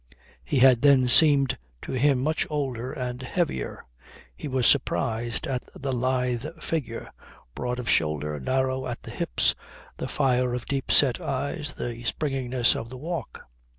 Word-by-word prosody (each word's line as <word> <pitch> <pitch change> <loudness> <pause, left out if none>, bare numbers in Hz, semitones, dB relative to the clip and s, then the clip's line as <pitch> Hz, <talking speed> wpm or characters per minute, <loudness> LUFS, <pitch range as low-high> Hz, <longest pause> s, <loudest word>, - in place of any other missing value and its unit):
He 135 - -1
had 125 -2 +6
then 140 -3 +5
seemed 140 0 +5 0.2
to - - -6
him 130 0 +2
much 155 +2 0
older 130 -5 -3
and 125 -1 -4
heavier. 130 - -2 0.5
He - - -6
was 130 -3 0
surprised 120 -4 +1
at 130 -3 -2
the 135 -1 -3
lithe 125 -1 0 0.2
figure, 145 -8 -4 0.4
broad 125 0 -3
of 125 - -5
shoulder, 75 -1 +1
narrow 130 - 0
at 120 - -6
the - - -8
hips, - - 0 0.4
the - - -4
fire 125 -3 +1
of 125 - -3
the - - -17
deep 135 -2 -1
set 130 -5 +5
eyes, 145 +2 -3
the 120 -1 -5
springiness 130 -2 0
of 115 - -5
the 130 - -8
walk. 160 -2 -5
130 Hz, 155 wpm, -26 LUFS, 120-140 Hz, 0.5 s, had